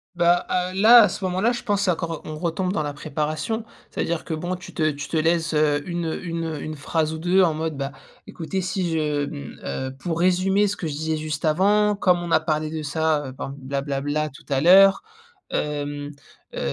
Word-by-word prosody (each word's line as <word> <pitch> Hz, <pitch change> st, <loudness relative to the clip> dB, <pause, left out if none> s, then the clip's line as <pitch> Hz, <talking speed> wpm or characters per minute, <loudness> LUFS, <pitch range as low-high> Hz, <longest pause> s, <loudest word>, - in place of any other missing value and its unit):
Bah 175 Hz, 0 st, +4 dB
à 180 Hz, 0 st, 0 dB
là, 225 Hz, +5 st, +8 dB
à 210 Hz, -, +3 dB
ce -, -, -6 dB
moment-là, 185 Hz, +6 st, +1 dB
je 240 Hz, -, -4 dB
pense 205 Hz, -3 st, 0 dB
c'est 190 Hz, -, +3 dB
encore 165 Hz, -2 st, -3 dB
on 155 Hz, 0 st, -6 dB
retombe 180 Hz, +2 st, -1 dB
dans 155 Hz, -, 0 dB
la 145 Hz, -1 st, -3 dB
préparation. 155 Hz, +8 st, -3 dB, 0.3 s
C'est-à-dire 170 Hz, -1 st, -2 dB
que -, -, -3 dB
bon, 175 Hz, +3 st, -3 dB
tu 180 Hz, -, -11 dB
te 155 Hz, -2 st, +1 dB
tu 140 Hz, -1 st, -5 dB
te 160 Hz, -, -1 dB
laisses, 165 Hz, +1 st, +1 dB
heu, 150 Hz, -1 st, +2 dB
une 170 Hz, -2 st, -2 dB
une 165 Hz, -2 st, -3 dB
une 155 Hz, +2 st, -5 dB
phrase 155 Hz, +2 st, -1 dB
ou 160 Hz, -, -5 dB
2 180 Hz, +3 st, +3 dB
en 165 Hz, -3 st, +3 dB
mode 160 Hz, -1 st, -3 dB
bah 140 Hz, 0 st, -3 dB, 0.3 s
écoutez 185 Hz, +3 st, -4 dB
si 185 Hz, -1 st, -2 dB
je 150 Hz, -2 st, 0 dB
mmh, 70 Hz, -, -8 dB
heu, 130 Hz, -, -4 dB
pour 165 Hz, +1 st, -3 dB
résumer 185 Hz, +3 st, +3 dB
ce 205 Hz, -, -2 dB
que 175 Hz, -, -4 dB
je 150 Hz, -, -4 dB
disais 160 Hz, +1 st, -2 dB
juste 155 Hz, -1 st, -4 dB
avant, 205 Hz, +6 st, +3 dB
comme 180 Hz, -3 st, +3 dB
on 170 Hz, -, -5 dB
a -, -, +5 dB
parlé 155 Hz, -1 st, -1 dB
de 160 Hz, -1 st, -4 dB
ça, 150 Hz, -1 st, 0 dB
heu, 130 Hz, -, -6 dB
ben 135 Hz, +1 st, -6 dB
bla 135 Hz, +1 st, -3 dB
bla 140 Hz, -1 st, -3 dB
bla 150 Hz, +2 st, -1 dB
tout 140 Hz, -, -16 dB
à 135 Hz, -2 st, +1 dB
l'heure, 195 Hz, -, +6 dB, 0.5 s
hem, 145 Hz, -1 st, -3 dB, 0.5 s
heu, -, -, -3 dB
160 Hz, 220 wpm, -23 LUFS, 150-180 Hz, 0.5 s, là